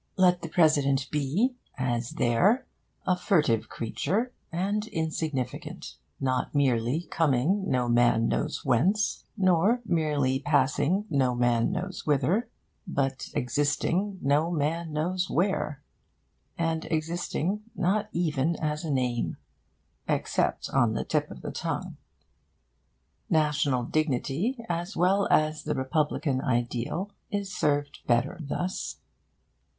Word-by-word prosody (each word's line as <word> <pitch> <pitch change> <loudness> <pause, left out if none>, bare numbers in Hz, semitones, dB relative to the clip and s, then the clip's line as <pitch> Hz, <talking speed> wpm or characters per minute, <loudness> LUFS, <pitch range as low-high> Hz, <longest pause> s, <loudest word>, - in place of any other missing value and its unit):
Let 180 -1 +4
the 165 - -5
President 145 -5 +3
be, 165 - +1 0.2
as 120 -2 -1
there, 185 - +3 0.4
a 185 - +3
furtive 150 - +2
creature 190 - -2 0.2
and 200 +5 -1
insignificant, 160 - -3 0.3
not 130 +1 -1
merely 130 +2 +2
coming 165 +6 +2
no 125 -1 +1
man 120 -1 +4
knows 150 - -2
whence, 175 - +2
nor 190 +5 +3
merely 150 -7 +1
passing 145 +7 +2
no 130 -4 +2
man 120 +2 +2
knows 185 0 -4
whither, 155 - +1 0.4
but 135 -5 -1
existing 145 - 0
no 145 +4 +3
man 165 +1 -1
knows 180 +5 -1
where; 160 -6 0 0.7
and 165 -1 -1
existing 170 +4 -1
not 205 +4 +1
even 165 -2 0
as 150 +1 -2
a 160 - -3
name 125 -4 0 0.7
except - - 0
on 120 -5 +3
the - - -1
tip - - 0
of - - -10
the - - -4
tongue. - - -4 1.3
National 150 -5 +2
dignity, 155 - -1
as 175 +2 -3
well 190 +4 +3
as 155 0 +3
the 150 - -1
republican 135 0 0
ideal, 125 - -1 0.2
is 200 -1 -3
served 145 -1 0
better 120 +9 +1
thus. 175 +5 -3
155 Hz, 115 wpm, -28 LUFS, 130-180 Hz, 1.3 s, Let